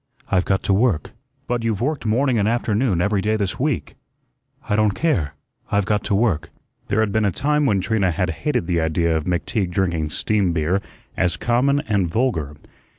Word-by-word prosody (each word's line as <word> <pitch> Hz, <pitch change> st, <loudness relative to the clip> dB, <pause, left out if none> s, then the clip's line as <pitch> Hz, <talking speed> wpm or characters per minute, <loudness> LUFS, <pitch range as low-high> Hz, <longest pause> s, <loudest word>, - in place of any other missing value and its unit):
"I've 90 Hz, -2 st, +2 dB
got 95 Hz, -1 st, 0 dB
to 100 Hz, -, +2 dB
work." 100 Hz, -6 st, +1 dB, 0.3 s
"But 120 Hz, -1 st, -2 dB
you've 110 Hz, -4 st, 0 dB
worked 140 Hz, 0 st, -1 dB
morning 120 Hz, +2 st, +2 dB
and 100 Hz, -, +2 dB
afternoon 110 Hz, -4 st, +1 dB
every 100 Hz, +1 st, +1 dB
day 110 Hz, +2 st, +1 dB
this 100 Hz, -4 st, -2 dB
week." 145 Hz, -1 st, -1 dB, 0.7 s
"I 105 Hz, -, +1 dB
don't 105 Hz, -2 st, +2 dB
care, 90 Hz, -, 0 dB, 0.4 s
I've 100 Hz, -1 st, +2 dB
got 105 Hz, 0 st, 0 dB
to 100 Hz, -, +1 dB
work." 90 Hz, -7 st, +1 dB, 0.4 s
There 110 Hz, -, +1 dB
had 110 Hz, -2 st, 0 dB
been 110 Hz, +1 st, +1 dB
a 100 Hz, -, +2 dB
time 150 Hz, -, +1 dB
when 100 Hz, -5 st, +2 dB
Trina 100 Hz, -1 st, +1 dB
had 90 Hz, 0 st, 0 dB
hated 125 Hz, -, -1 dB
the 85 Hz, -1 st, 0 dB
idea 80 Hz, +1 st, +1 dB
of 80 Hz, -1 st, -1 dB
McTeague 90 Hz, +2 st, -1 dB
drinking 85 Hz, -4 st, 0 dB
steam 100 Hz, +2 st, 0 dB
beer 85 Hz, +4 st, +1 dB, 0.3 s
as 90 Hz, -2 st, 0 dB
common 135 Hz, +4 st, +2 dB
and 105 Hz, -, 0 dB
vulgar. 80 Hz, -, -1 dB
100 Hz, 190 wpm, -21 LUFS, 90-115 Hz, 0.7 s, I've